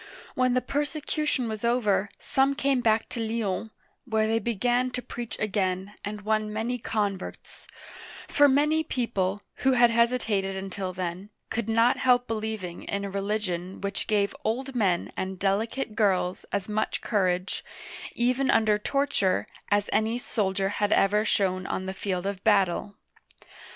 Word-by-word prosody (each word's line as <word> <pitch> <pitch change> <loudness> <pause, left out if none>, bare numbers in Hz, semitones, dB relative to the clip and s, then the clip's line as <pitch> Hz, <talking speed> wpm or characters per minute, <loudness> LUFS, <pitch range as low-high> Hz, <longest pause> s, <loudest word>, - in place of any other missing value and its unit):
When 255 -1 +2
the 255 - +3
persecution 295 -1 -1
was 220 -1 -5
over, 215 -4 +2
some 270 +1 +1
came 275 -3 +1
back 225 -1 +2
to 240 - -5
Lyons, 220 -2 -2 0.4
where 220 -3 +1
they 225 +1 +2
began 245 +2 +1
to 250 0 -4
preach 240 -1 -5
again, 195 -1 -1
and 205 0 -5
won 215 0 0
many 230 +3 -2
converts; 205 -4 -4 0.6
for 290 0 +5
many 300 +3 +3
people, 205 -8 -1
who 265 0 +3
had 240 -1 +5
hesitated 230 -5 +1
until 190 0 -4
then, 185 +2 -4 0.2
could 225 -1 -2
not 230 +2 +4
help 245 -1 +3
believing 215 -5 -4
in 200 0 -2
a 200 - -5
religion 195 -2 -2
which 200 0 -3
gave 205 -2 +1
old 260 +5 -2
men 195 -8 +1
and 190 0 -3
delicate 215 +6 0
girls 190 -4 +1
as 200 -2 -1
much 215 0 -1
courage, 185 -3 0 0.5
even 250 +3 +1
under 215 -2 +4
torture, 245 -7 +1 0.2
as 205 0 +2
any 220 +2 +2
soldier 195 -5 -1
had 205 +1 0
ever 210 +1 +4
shown 185 -4 +1
on 190 - -2
the 190 - -3
field 190 -1 -3
of 200 -1 -3
battle. 200 -1 +2
215 Hz, 150 wpm, -27 LUFS, 195-240 Hz, 0.6 s, for